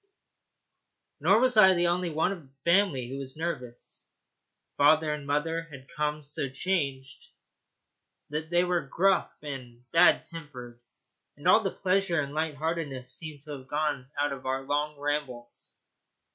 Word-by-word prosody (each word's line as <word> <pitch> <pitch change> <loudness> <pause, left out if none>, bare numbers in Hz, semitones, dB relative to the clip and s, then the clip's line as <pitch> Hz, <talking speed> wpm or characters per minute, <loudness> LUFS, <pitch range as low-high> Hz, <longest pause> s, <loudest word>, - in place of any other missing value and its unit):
Nor 200 +3 +4
was 255 -3 +3
I 190 -3 +8
the 175 0 +2
only 175 +1 +1
one 160 +4 +1
of 190 -3 -6
the 135 -2 -23
family 170 -8 +3
who 135 +2 -6
was 135 +1 -6
nervous. 125 -8 -6 0.7
Father 150 +1 +4
and 150 -2 -7
mother 165 +3 -1
had 135 -3 -11
become 150 +1 -3
so 140 -1 -3
changed 135 -4 -3 1.0
that 155 +1 -3
they 175 +1 +3
were 180 -1 +1
gruff 195 +2 +1
and 125 -4 -8
bad 170 +2 +5
tempered; 125 -8 -9 0.6
and - - -4
all - - +7
the - - -1
pleasure 185 -2 +1
and 140 -1 -3
light 155 -1 -1
heartedness 145 -5 -3
seemed 150 -2 -6
to 150 - -10
have 135 -2 -8
gone 145 -3 -2
out 145 0 +1
of 130 -1 -8
our 135 +1 -1
long 145 +2 -1
rambles. 140 -5 -4
150 Hz, 155 wpm, -28 LUFS, 135-165 Hz, 1.0 s, I